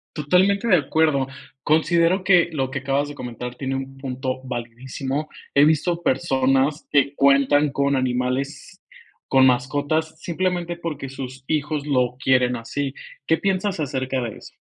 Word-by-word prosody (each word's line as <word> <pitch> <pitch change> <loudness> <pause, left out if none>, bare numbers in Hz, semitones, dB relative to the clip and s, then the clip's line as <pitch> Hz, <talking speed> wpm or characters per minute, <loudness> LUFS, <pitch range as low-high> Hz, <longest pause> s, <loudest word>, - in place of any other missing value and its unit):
Totalmente 185 +8 +2
de 185 - +6
acuerdo. 145 -2 +1 0.3
Considero 170 +4 +2
que 180 -3 +5
lo 135 -4 -1
que 135 - -3
acabas 140 +2 0
de 145 - -8
comentar, 125 -2 -6
tiene 135 +1 -3
un 135 0 -6
punto 130 -1 -4
validísimo. 130 +4 -4 0.3
He 140 - +6
visto 165 +3 +1
personas 135 +2 +1
que 140 0 +2
cuentan 140 +1 +4
con 140 0 +1
animales, 130 +2 -2 0.5
con 130 -1 +5
mascotas, 145 +5 0
simplemente, 175 0 -2
porque 160 -5 -5
sus 130 0 -8
hijos 150 -1 -1
lo 125 -3 +1
quieren 125 -1 +3
así, 135 +4 -4 0.3
¿qué 160 - +3
piensas 195 +2 -1
acerca 130 -2 -2
de 115 -3 -5
eso? - - -14
140 Hz, 145 wpm, -22 LUFS, 130-155 Hz, 0.5 s, de